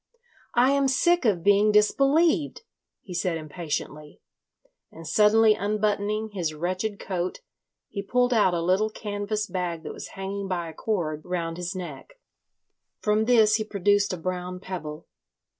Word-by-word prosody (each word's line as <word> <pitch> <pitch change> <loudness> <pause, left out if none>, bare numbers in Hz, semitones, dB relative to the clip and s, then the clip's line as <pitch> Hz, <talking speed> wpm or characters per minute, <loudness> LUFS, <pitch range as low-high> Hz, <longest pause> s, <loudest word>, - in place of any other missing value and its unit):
"I 250 +3 +5
am 280 -1 +2
sick 345 +5 +2
of 185 -7 +2
being 205 +2 +4
disbelieved," 285 - +3 0.4
he 185 - -9
said 175 -1 -1
impatiently, 155 -1 -5 0.7
and 165 +1 -11
suddenly 215 +3 +5
unbuttoning 210 +1 -1
his 165 -5 -2
wretched 185 +6 -2
coat 185 - -4 0.5
he 200 - -5
pulled 245 +5 +1
out 205 -6 +3
a 165 - -1
little 190 +5 +2
canvas 210 0 -3
bag 175 -3 -3
that - - -6
was - - -8
hanging 195 +1 -4
by 175 -3 -3
a - - -10
cord 160 -7 -2
round 170 -2 -3
his 180 +1 -4
neck. 180 - -8 0.8
From 210 +1 +1
this 220 -3 +5
he 215 - -2
produced 205 -1 +1
a 185 - -3
brown 180 +1 -4
pebble. 165 -5 -7
200 Hz, 145 wpm, -26 LUFS, 175-215 Hz, 0.8 s, I